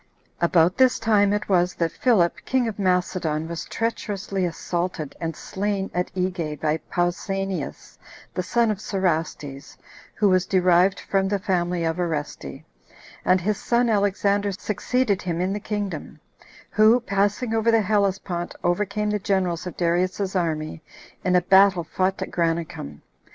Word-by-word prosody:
1. 170 - +3
About 175 +1 +3
this 260 -1 +4
time 205 -3 +3
it 210 0 -1
was 180 -2 +2
that 165 -1 0
Philip, 200 -9 +2
king 255 -2 +1
of 215 -2 -5
Macedon, 180 -4 0
was 170 0 -5
treacherously 205 -4 -2
assaulted 170 -2 -3
and 165 -2 -3
slain 195 +2 -3
at 180 0 -1
Egae 175 -5 -2
by 155 +1 +1
Pausanias, 175 - -3 0.3
the - - -1
son 225 +4 +1
of 205 - -3
Cerastes, 160 -8 -2 0.4
who 210 - +3
was 185 -1 +3
derived 185 0 +3
from 195 -1 0
the 200 +1 0
family 180 -3 -1
of 165 0 -1
Oreste, 160 -4 -4 0.6
and 185 +1 +4
his 210 +3 0
son 240 0 +1
Alexander 200 0 +1
succeeded 210 +1 -1
him 170 -2 -3
in 185 +2 0
the 205 - -3
kingdom; 205 -1 -4 0.5
who, 215 +3 +5
passing 205 +2 0
over 225 +1 +2
the 225 -1 +4
Hellespont, 195 -4 -1
overcame 210 +4 0
the 210 - 0
generals 185 -3 -1
of 180 - -7
Darius's 185 +3 0
army 160 -3 -2 0.4
in 180 0 +2
a 180 - +5
battle 190 0 +5
fought 185 +3 -1
at - - -8
Granicum. 165 - -2
185 Hz, 150 wpm, -24 LUFS, 175-205 Hz, 0.6 s, who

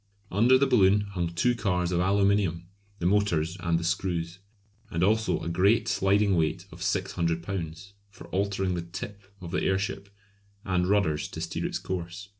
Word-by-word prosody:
Under 120 +7 +5
the 140 - +3
balloon 105 -6 +4
hung 95 -4 -3
two 85 +9 +1
cars 90 -6 0
of 85 - +1
aluminium, 100 -2 +2 0.3
the 85 - -4
motors 90 -4 +1
and 85 -2 +1
the 85 - -3
screws; 85 0 -2 0.5
and 85 +1 -1
also 110 +3 +2
a - - -5
great 95 +7 +3
sliding 100 0 +2
weight 85 +2 0
of 85 +1 -12
600 90 -4 -1
lbs. 90 0 -5 0.2
for 100 - -13
altering 95 -1 0
the 85 - -2
"tip" 95 +4 -7 0.2
of 85 -2 -7
the 90 - 0
airship; 95 +1 -1 0.6
and 90 -2 +1
rudders 95 -7 +1
to - - -8
steer 85 0 -3
its - - -3
course. 90 +2 -5
95 Hz, 170 wpm, -27 LUFS, 85-100 Hz, 0.6 s, Under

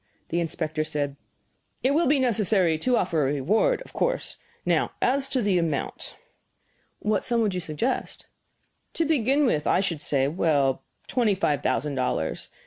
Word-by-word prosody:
The 170 - 0
inspector 155 -2 -2
said: 145 -2 -2 0.7
"It 265 - +3
will 330 +4 +3
be 285 +2 +4
necessary 205 -9 +2
to 250 +6 +2
offer 170 -4 +1
a 140 0 +1
reward, 215 - +1
of - - -17
course. - - -1 0.3
Now - - +1
as 270 +1 +1
to 260 -3 0
the 195 -3 +2
amount?" 160 -4 -3 0.8
"What 210 -1 0
sum 235 -1 +1
would 210 -4 +1
you 180 - -1
suggest?" 175 - -3 0.7
"To 330 - +1
begin 285 -1 +2
with, 150 - +1
I - - +3
should 175 -6 -1
say 135 -2 +1
well, 145 -4 +1 0.2
twenty 230 -6 +1
five 150 -7 0
thousand 150 -1 0
dollars. 125 -11 -2
185 Hz, 160 wpm, -26 LUFS, 150-250 Hz, 0.8 s, be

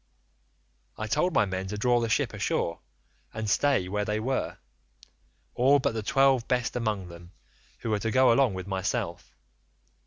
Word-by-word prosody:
"I 110 - -3
told 150 +11 +1
my 105 - +3
men 95 0 -4
to 105 +2 -5
draw 120 +2 +2
the 115 -1 -1
ship - - 0
ashore, 85 - -1 0.6
and 110 -1 -3
stay 130 -2 +2
where 105 +2 -1
they 105 +1 -1
were, 130 +4 -2 1.0
all 135 +4 +4
but 130 - 0
the 110 - -3
twelve 135 0 +3
best 125 -1 0
among 105 -6 -2
them, 85 +1 -13 0.5
who 115 - -3
were 105 - +1
to 115 - -2
go 130 +1 +5
along 125 -5 +2
with 95 -1 -5
myself. 95 0 -3
110 Hz, 165 wpm, -27 LUFS, 100-125 Hz, 1.0 s, go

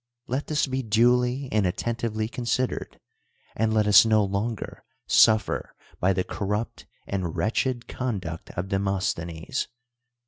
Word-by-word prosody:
Let 130 +4 -3
this 150 -1 +1
be 135 -1 -2
duly 125 +4 +2
and 105 -3 +2
attentively 110 +2 -2
considered, 125 +2 -2 0.6
and 110 +1 +1
let 110 -1 +3
us 100 -2 +8
no 110 -2 +3
longer 100 +3 -3 0.2
suffer 110 -1 +3 0.2
by 95 - +3
the 95 -1 0
corrupt 105 +4 -3 0.2
and 95 -5 -3
wretched 120 +2 0
coridnct 95 -10 -4
of 90 +2 -2
Dr'inostlK'nes. 95 -4 -2
110 Hz, 125 wpm, -26 LUFS, 95-120 Hz, 0.6 s, us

